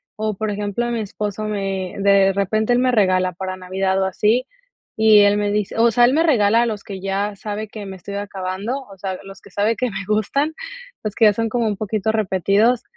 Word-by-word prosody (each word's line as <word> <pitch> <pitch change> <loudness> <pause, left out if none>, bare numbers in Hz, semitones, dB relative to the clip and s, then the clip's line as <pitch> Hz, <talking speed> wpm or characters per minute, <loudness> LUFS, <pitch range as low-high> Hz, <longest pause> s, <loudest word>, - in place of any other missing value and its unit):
o 215 -1 -2
por 215 +2 -3
ejemplo, 205 +3 -2
mi 235 - -1
esposo 210 0 -4
me 195 -3 -3
de 195 -1 +4
repente 215 +4 +1
él 240 - +3
me 255 0 +2
regala 185 -5 +2
para 185 +1 -5
Navidad, 190 +1 -1
o - - +2
así 215 +6 +1 0.5
y 220 -1 +7
él 205 0 +5
me 205 0 0
dice, 210 0 -2
o 230 +1 +4
sea, 240 +2 +5
él 250 - +3
me 325 - +3
regala, 230 -6 +3
los 215 -3 -4
que 195 -2 -7
ya 195 +2 -2
sabe 210 +1 -5
que 210 0 -8
me 195 -1 -7
estoy 200 +2 -8
acabando, 200 +4 -4
o 195 - -13
sea, 190 0 -4
los 195 0 -12
que 200 - -17
sabe 210 +4 +1
que 250 +2 -2
me 195 0 -5
gustan, 275 +9 0 0.5
los 215 -2 -3
que 225 - +3
ya 210 - +6
son 225 +2 -1
como 235 0 0
un 205 -2 -2
poquito 215 0 -1
repetidos, 215 +3 +2
205 Hz, 220 wpm, -20 LUFS, 195-220 Hz, 0.5 s, y